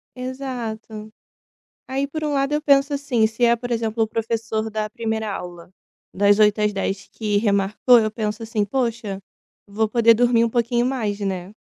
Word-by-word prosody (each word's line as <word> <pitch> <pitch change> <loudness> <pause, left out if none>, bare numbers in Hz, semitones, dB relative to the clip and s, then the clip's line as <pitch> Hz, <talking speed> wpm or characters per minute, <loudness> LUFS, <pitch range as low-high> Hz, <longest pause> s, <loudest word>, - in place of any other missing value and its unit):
Exato. 240 -4 -6 0.8
Aí, 270 +1 -1
por 310 +2 -6
um 295 - -1
lado, 275 +1 0
eu 300 - 0
penso 280 -1 +3
assim: 260 -6 +1
se 225 +2 -1
é, 235 0 +4
por 245 +1 -7
exemplo, 225 -1 -1
o - - +2
professor 225 -1 -2
da 215 0 -2
1ª 220 -1 -3
aula, 175 -2 -8 0.4
das 205 +1 +4
8h00 210 0 +4
às 210 0 +2
10h00, 195 -1 -3
que 210 -2 -1
remarcou, 205 +3 +3
eu 215 -1 +1
penso 215 0 -4
assim: 220 -2 -1
"Poxa, 225 -3 -2 0.5
vou 215 +2 -1
poder 230 0 +5
dormir 235 0 +3
um 230 - -1
pouquinho 240 +1 +1
mais, 220 -6 -2
né". 190 -1 -4
225 Hz, 175 wpm, -22 LUFS, 210-245 Hz, 0.8 s, poder